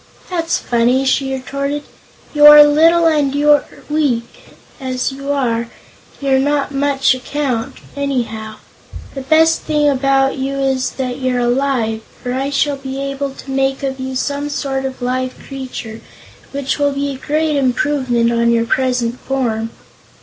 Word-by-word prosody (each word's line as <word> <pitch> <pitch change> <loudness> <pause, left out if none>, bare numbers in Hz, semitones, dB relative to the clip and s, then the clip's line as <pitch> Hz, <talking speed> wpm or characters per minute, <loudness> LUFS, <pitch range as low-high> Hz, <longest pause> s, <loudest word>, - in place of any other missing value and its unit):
"That's 335 -2 0
funny," 245 +3 +1
she 270 0 +1
retorted. 280 +2 -3 0.5
"You 295 0 +7
are 295 0 +11
little, 325 +3 +4
and 295 -4 +2
you're 295 0 +4 0.2
weak; 280 -6 -2 0.2
as 255 -1 -2
you 275 +1 -5
are, 235 -4 0 0.5
you're 270 -2 +2
not 285 +1 0
much 275 -1 +2
account, 255 -2 -3 0.2
anyhow. 235 -6 -3 0.6
The 270 - -5
best 320 +4 +3
thing 300 -1 +1
about 270 0 +2
you 270 +1 -2
is 265 -1 0
that 255 -1 -4
you're 255 -1 0
alive, 240 -3 0 0.2
for 245 - -2
I 270 +2 -1
shall 285 0 0
be 270 0 -6
able 275 0 -3
to 270 - -9
make 270 0 0
of 265 -1 -3
you 260 0 -4
some 285 +2 -2
sort 270 -2 -2
of 260 -1 -5
live 255 +1 -2
creature 255 -5 -8 0.5
which 280 +1 -2
will 285 -1 +2
be 280 0 -2
a 270 - -6
great 310 +1 +1
improvement 255 -3 +1
on 235 0 +2
your 230 0 +2
present 250 -1 0
form." 230 -4 -2
270 Hz, 150 wpm, -17 LUFS, 255-285 Hz, 0.6 s, are